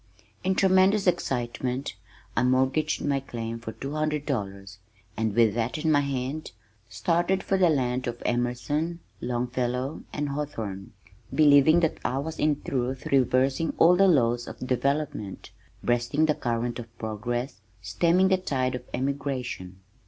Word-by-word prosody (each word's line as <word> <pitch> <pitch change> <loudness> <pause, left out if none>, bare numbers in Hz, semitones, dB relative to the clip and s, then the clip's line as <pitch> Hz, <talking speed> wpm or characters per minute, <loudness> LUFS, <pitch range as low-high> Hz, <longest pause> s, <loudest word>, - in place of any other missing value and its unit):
In 190 +1 +1
tremendous 190 +2 +4
excitement 125 - -1 0.4
I - - +2
mortgaged 130 +4 +1
my 140 -1 +1
claim 115 -3 -5
for 115 -1 -6
two 135 - -6
hundred 155 -1 -1
dollars 100 -6 -4 0.4
and 110 -2 -1
with 115 -3 +4
that 115 +4 -1
in 155 +1 +1
my 145 - +5
hand, 140 +2 -3 0.4
started 175 - 0
for 195 - +1
the 185 -2 +4
land 125 -4 0
of 120 0 -5
Emerson, 145 +8 -1 0.2
Longfellow, 125 +2 -2
and 145 -1 -2
Hawthorne, 115 -10 -5 0.4
believing 155 +2 +6
that 165 - 0
I 130 - -1
was 160 +4 -4
in 150 -1 +1
truth 130 0 -2
reversing 135 +3 +2
all 175 +2 +6
the 195 +2 +5
laws 120 -7 +2
of - - -7
development, 130 -5 -2 0.3
breasting 120 +6 +2
the 155 - +3
current 120 -2 -2
of 115 0 -10
progress, 120 +2 -4 0.2
stemming 170 - +3
the 190 - +4
tide 130 -8 -1
of 125 - -4
emigration. 130 -8 -3
130 Hz, 145 wpm, -26 LUFS, 120-155 Hz, 0.4 s, believing